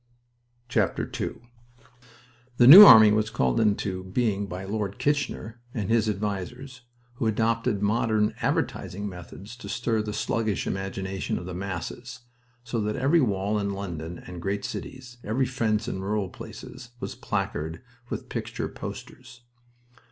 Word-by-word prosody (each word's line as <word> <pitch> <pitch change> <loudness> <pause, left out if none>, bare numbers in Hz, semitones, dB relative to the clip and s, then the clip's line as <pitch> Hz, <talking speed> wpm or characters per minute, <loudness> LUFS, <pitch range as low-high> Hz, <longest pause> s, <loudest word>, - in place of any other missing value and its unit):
II 105 -5 +4 1.7
The 120 - +6
New 175 +11 +13
Army 110 - +10
was 110 0 +1
called 65 - +1
into 100 -3 0
being 100 +1 -1
by 90 0 -6
Lord 100 -1 -3
Kitchener 130 -5 -2
and 105 -3 -2
his 115 -2 +3
advisers, 105 +6 -4 0.4
who 115 - 0
adopted 110 0 0
modern 110 0 +1
advertising 100 +3 -2
methods 95 +3 -10
to 100 -4 -9
stir 115 0 0
the 105 0 -4
sluggish 110 -1 -1
imagination 95 0 -3
of 85 - -6
the 90 - -6
masses, 100 +7 -6 0.4
so 115 -1 -2
that 105 0 -2
every 150 +5 +3
wall 105 -3 0
in 100 -1 -2
London 85 -4 -6
and 90 -1 -8
great 100 +2 -2
cities, 125 -2 -8
every 125 +5 0
fence 115 -4 -1
in 95 - -4
rural 100 -1 -2
places, 120 +6 -10
was - - -5
placarded 80 +3 -3 0.3
with - - -5
picture - - -4
posters. 120 - -9
105 Hz, 135 wpm, -26 LUFS, 95-115 Hz, 1.7 s, New